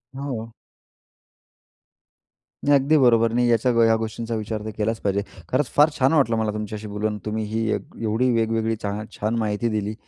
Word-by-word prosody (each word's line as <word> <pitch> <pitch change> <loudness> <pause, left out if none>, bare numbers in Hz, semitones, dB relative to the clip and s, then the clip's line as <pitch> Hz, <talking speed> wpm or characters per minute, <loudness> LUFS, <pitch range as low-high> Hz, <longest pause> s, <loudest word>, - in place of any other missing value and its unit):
हो. 125 -5 -5 2.1
नाही, 145 0 +4
अगदी 150 +4 +3
बरोबर. 115 -4 +4
नाही, 120 0 +2
याच्या 115 +2 +3
ह्या 115 0 +5
गोष्टींचा 115 +1 -3
विचार 110 0 -4
तर 110 - -3
केलाच 110 +1 -1
पाहिजे 100 0 0 0.3
खरंच 130 +1 +1
फार 150 +2 +6
छान 130 +4 +3
वाटलं 125 -7 +3
मला 110 -1 0
तुमच्याशी 105 0 -5
बोलून. 105 +1 -2
तुम्ही 110 +1 -2
ही 110 +1 -1 0.3
एवढी 115 +3 +1
वेगवेगळी 115 0 0
छा 105 +1 -2
छान 110 +2 -1
माहिती 110 +1 -1
दिली 105 0 -2
110 Hz, 160 wpm, -23 LUFS, 110-120 Hz, 2.1 s, फार